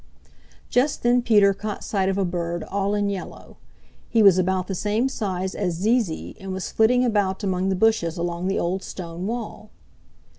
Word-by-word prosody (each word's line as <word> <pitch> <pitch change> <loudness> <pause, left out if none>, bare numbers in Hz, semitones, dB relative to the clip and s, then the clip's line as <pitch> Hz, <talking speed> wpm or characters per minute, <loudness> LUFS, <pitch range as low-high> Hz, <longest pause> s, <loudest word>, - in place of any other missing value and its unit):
Just 265 +4 +1
then 245 +1 +4
Peter 205 -4 +4
caught 210 +1 -5
sight 195 -2 0
of 195 - -1
a 195 - +1
bird 175 -1 -3
all 200 +1 -1
in 205 -1 0
yellow. 200 -2 -6 0.5
He 225 -2 +3
was 190 -2 +7
about 185 0 0
the 195 - -4
same 210 +6 0
size 190 -7 -3
as 180 -4 -2
Zee 220 +8 +3
Zee 170 -8 -6
and 190 0 -7
was 190 0 -4
flitting 245 +3 +3
about 205 -3 0
among 190 -1 0
the 190 - +1
bushes 185 -5 +1
along 170 +1 -2
the 195 - 0
old 185 +3 -1
stone 175 0 -6
wall. 225 -2 -5
195 Hz, 185 wpm, -23 LUFS, 185-215 Hz, 0.5 s, was